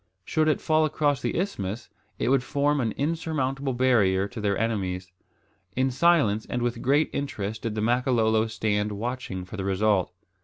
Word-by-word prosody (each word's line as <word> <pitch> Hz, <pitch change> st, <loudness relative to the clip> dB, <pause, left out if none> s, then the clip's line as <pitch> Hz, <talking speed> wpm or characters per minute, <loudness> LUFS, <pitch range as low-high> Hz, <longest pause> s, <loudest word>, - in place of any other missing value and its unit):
Should 155 Hz, -1 st, +1 dB
it 155 Hz, -, +2 dB
fall 155 Hz, 0 st, +2 dB
across 145 Hz, -2 st, +1 dB
the -, -, -1 dB
isthmus, 115 Hz, -, -3 dB, 0.3 s
it -, -, 0 dB
would 135 Hz, -1 st, +4 dB
form 145 Hz, +2 st, +1 dB
an 115 Hz, -3 st, 0 dB
insurmountable 140 Hz, -3 st, -1 dB
barrier 105 Hz, -7 st, +3 dB
to 120 Hz, -3 st, -7 dB
their 100 Hz, -2 st, +1 dB
enemies. 95 Hz, -5 st, -2 dB, 0.6 s
In 130 Hz, +1 st, +1 dB
silence 130 Hz, -8 st, +3 dB
and 120 Hz, -, -1 dB
with 120 Hz, 0 st, 0 dB
intense 140 Hz, +6 st, +2 dB
interest 110 Hz, -7 st, -3 dB
did 115 Hz, -2 st, -3 dB
the 105 Hz, -, -1 dB
Makololo 115 Hz, -2 st, +2 dB
stand 105 Hz, -1 st, -1 dB
watching 110 Hz, -4 st, -4 dB
for 105 Hz, -, -9 dB
the 95 Hz, -, -3 dB
result. 95 Hz, -1 st, +1 dB
120 Hz, 165 wpm, -26 LUFS, 105-140 Hz, 0.6 s, would